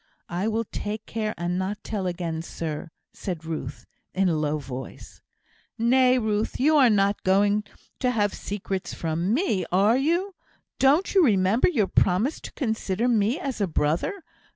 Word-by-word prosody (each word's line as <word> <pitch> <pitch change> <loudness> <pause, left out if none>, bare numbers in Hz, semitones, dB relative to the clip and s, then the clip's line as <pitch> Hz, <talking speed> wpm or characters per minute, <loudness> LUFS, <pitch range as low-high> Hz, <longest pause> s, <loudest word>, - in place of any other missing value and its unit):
"I 180 +4 -1
will 225 +1 0
take 210 0 -5
care 215 -1 -3
and 175 +1 -1
not 195 +2 -3
tell 200 -4 -3
again, 170 -2 -3
sir," 165 -1 -5 0.2
said 170 -4 -5
Ruth, 155 -4 -5 0.3
in 190 -1 +2
a 165 - +1
low 150 0 0
voice. 130 -3 -9 0.6
"Nay, 255 +2 +4
Ruth, 215 -2 -1
you 305 +4 +4
are 260 -4 +6
not 200 -1 +2
going 205 +2 +2 0.3
to 250 - +1
have 205 -4 +1
secrets 195 -2 -4
from 165 +3 -1
me, 235 - +1
are 200 +6 +4
you? 340 +8 0 0.5
Don't 285 +8 +3
you 385 -3 +6
remember 205 - +3
your 240 - +2
promise 190 - +1
to - - -9
consider 220 - -1
me 230 - +2
as 270 - -4
a 200 - +2
brother? 165 - -1
205 Hz, 160 wpm, -25 LUFS, 180-245 Hz, 0.6 s, are